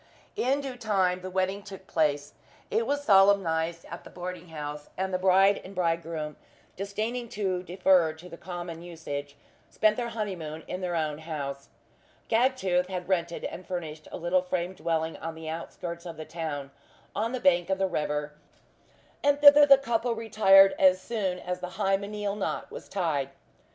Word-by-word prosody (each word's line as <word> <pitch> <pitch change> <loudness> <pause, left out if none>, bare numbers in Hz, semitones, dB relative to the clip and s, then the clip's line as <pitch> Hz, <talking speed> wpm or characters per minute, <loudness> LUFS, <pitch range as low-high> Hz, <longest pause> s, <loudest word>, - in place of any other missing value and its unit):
In 270 +3 +1
due 265 -3 -6
time 190 -5 +1
the 185 - -6
wedding 190 +2 -1
took 195 -2 -11
place. 145 -4 0 0.4
It 455 +1 +1
was 285 0 0
solemnized 185 - +3
at 170 - -9
the - - -12
boarding 180 0 -7
house; 150 -2 -7
and 190 0 -2
the 185 - +1
bride 195 +2 +4
and 195 +1 -11
bridegroom 165 -3 -2 0.4
disdaining 220 +5 -3
to 190 -4 -1
defer 180 -2 +3
to 160 +3 -13
the 175 - -9
common 175 -2 -7
usage, 145 -5 -6 0.3
spent 215 0 +2
their 240 -1 -2
honeymoon 180 -9 -5
in 185 - -4
their 180 -1 -2
own 155 -2 -1
house. 140 -4 -5 0.6
Gagtooth 225 -7 +2
had 180 -2 -5
rented 170 -2 -1
and 185 - -5
furnished 160 -4 -5
a - - -5
little 175 +2 +1
frame 180 0 -2
dwelling 160 -2 -2
on 165 0 -6
the 160 0 -8
outskirts 170 +2 -6
of 165 -2 -8
the 155 - -7
town, 150 -5 -5 0.4
on 220 +3 -1
the 255 - -2
bank 175 -3 +3
of 190 - +1
the 190 - +1
river; 150 -4 -2 0.9
and 285 0 +3
thither 290 0 +9
the 275 -1 +9
couple 235 -2 -1
retired 200 -3 +6
as 185 -1 +6
soon 190 -3 -2
as 180 0 -4
the 180 +1 -7
hymeneal 200 0 -1
knot 205 - -3
was - - -9
tied. 155 -8 -1
180 Hz, 170 wpm, -28 LUFS, 165-200 Hz, 0.9 s, thither